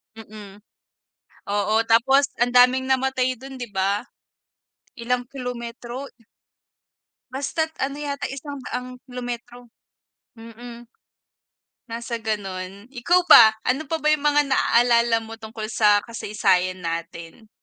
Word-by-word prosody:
Mm, 210 -2 -12 0.9
oo, 205 +1 0
tapos 265 +5 +4
ang 245 0 +2
daming 250 +1 +5
namatay 260 -1 +1
don, 270 0 -10
'di 245 -4 -7
ba. 200 +2 0 0.9
Ilang 245 +1 -2
kilometro. 245 0 -7 1.2
Basta't 285 +4 -2
ano 275 +1 -2
yata, 285 -1 -4
isang 280 +1 -7
daang 250 +1 -6
kilometro. 245 -1 -7 0.7
Mm, 235 +1 -12 1.0
nasa 235 +1 -4
gano'n. 200 -2 -5
Ikaw 270 +8 +2
ba, 220 -1 +9 0.2
ano 265 +5 +1
pa 320 +2 -3
ba 305 - -1
yung 295 - -11
mga 295 -1 +3
naaalala 235 -3 +3
mo 225 0 -9
tungkol 220 -1 -7
sa 210 -2 +3
kasaysayan 185 -5 0
natin? 170 +4 -6
240 Hz, 110 wpm, -23 LUFS, 215-260 Hz, 1.2 s, ba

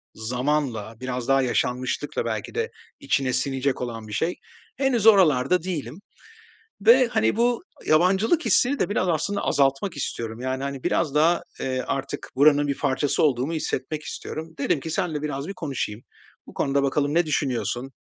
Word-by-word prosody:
zamanla 125 -1 -2
biraz 125 -1 -4
daha 135 0 +4
yaşanmışlıkla 125 +3 -1
belki - - -4
de 455 0 -1 0.3
içine 130 -2 0
sinecek 135 0 -1
olan 115 -3 -5
bir 105 - -8
şey. 165 +11 -1 0.4
Henüz 255 -5 +1
oralarda 175 -4 +5
değilim 165 - -5 0.8
ve 240 +3 +6
hani 110 - +1
bu 240 0 +1 0.2
yabancılık 190 - +3
hissini 270 +3 +3
de - - +1
biraz 185 -2 0
aslında 185 +5 0
azaltmak 140 +5 +1
istiyorum. 115 -3 -4
Yani, 130 +1 -3
hani, 140 -1 -5
biraz 150 -4 0
daha, 165 +3 +3 0.2
eee, 130 -1 -1
artık 135 - -4
buranın 145 +1 +5
bir 140 - -1
parçası 140 +3 0
olduğumu 135 +1 +1
hissetmek 155 -1 -3
istiyorum. 160 +2 -7
Dedim 155 +1 +1
ki 160 - -7
seninle 155 -2 -1
biraz 145 -1 -4
bir 195 - -5
konuşayım. 135 - -4 0.5
Bu - - -12
konuda 140 0 +1
bakalım 145 +1 0
ne 170 0 +3
düşünüyorsun? 135 -3 -1
145 Hz, 155 wpm, -24 LUFS, 130-170 Hz, 0.8 s, ve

